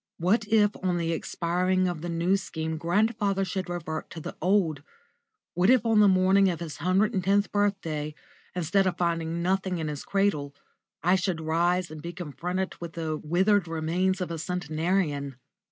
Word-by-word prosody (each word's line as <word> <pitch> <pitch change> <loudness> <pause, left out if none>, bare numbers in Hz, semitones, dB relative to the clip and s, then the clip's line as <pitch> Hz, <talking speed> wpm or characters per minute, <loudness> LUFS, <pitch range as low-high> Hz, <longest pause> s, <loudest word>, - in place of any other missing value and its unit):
What 205 +6 +1
if 210 -1 +4
on 180 -2 0
the 165 -1 -1
expiring 180 +3 0
of 175 -3 -3
the 175 - -4
New 170 +3 +1
Scheme 160 -4 -4
grandfather 200 +2 +1
should 185 0 -4
revert 160 -3 -4
to 165 - -8
the - - -7
old? 175 -5 +2 0.7
What 180 +4 +2
if 250 -2 +5
on 225 -2 +4
the 210 - +7
morning 190 +1 +4
of 170 -3 -3
his 165 -3 -6
hundred 190 +7 +2
and 190 -3 0
tenth 200 +2 +2
birthday, 165 -8 -1 0.4
instead 185 +3 +2
of 185 - -1
finding 170 -1 -1
nothing 190 0 0
in 160 -2 -2
his 145 -1 -5
cradle, 155 -8 0 0.5
I 180 +2 +4
should 185 -3 0
rise 170 +2 +1
and 155 -1 -8
be 170 +2 -6
confronted 180 +3 -4
with 170 -1 -6
the 160 -2 -2
withered 180 +5 +2
remains 170 +4 0
of 180 - -3
a 165 - -4
centenarian? 160 -4 -1
180 Hz, 175 wpm, -27 LUFS, 165-195 Hz, 0.7 s, the